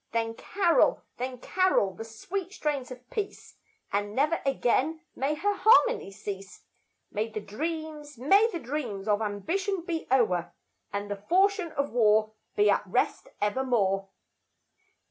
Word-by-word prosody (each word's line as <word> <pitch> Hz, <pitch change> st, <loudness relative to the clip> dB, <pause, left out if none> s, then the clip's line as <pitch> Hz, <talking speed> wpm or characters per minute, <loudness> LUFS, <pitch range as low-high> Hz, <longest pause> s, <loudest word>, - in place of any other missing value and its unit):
Then 225 Hz, 0 st, 0 dB
carol, 380 Hz, -, +2 dB
then 255 Hz, +1 st, -4 dB
carol 365 Hz, -, +2 dB
the 225 Hz, -, -7 dB
sweet 360 Hz, -, -5 dB
strains 290 Hz, -8 st, -2 dB
of 250 Hz, -1 st, -11 dB
peace, 410 Hz, -2 st, -5 dB, 0.4 s
And 205 Hz, +1 st, -1 dB
never 305 Hz, +5 st, +2 dB
again 275 Hz, +4 st, +1 dB
may 280 Hz, +3 st, 0 dB
her 410 Hz, +7 st, +1 dB
harmony 465 Hz, -, +4 dB
cease; 195 Hz, -2 st, -8 dB, 0.5 s
May 215 Hz, +2 st, -1 dB
the 215 Hz, -1 st, -4 dB
dreams, 300 Hz, +5 st, -5 dB
may 395 Hz, -, +5 dB
the 350 Hz, -, -3 dB
dreams 240 Hz, -9 st, -4 dB
of 210 Hz, 0 st, +2 dB
ambition 340 Hz, -, -1 dB
be 335 Hz, -3 st, -3 dB
o'er, 215 Hz, -10 st, +2 dB, 0.4 s
And 205 Hz, 0 st, -4 dB
the 205 Hz, -, -2 dB
falchion 370 Hz, -, +2 dB
of 280 Hz, 0 st, -1 dB
war 215 Hz, -2 st, +3 dB, 0.2 s
be 210 Hz, 0 st, +4 dB
at 200 Hz, -, +4 dB
rest 185 Hz, -, 0 dB
evermore. 205 Hz, -4 st, +1 dB
255 Hz, 140 wpm, -28 LUFS, 210-335 Hz, 0.5 s, may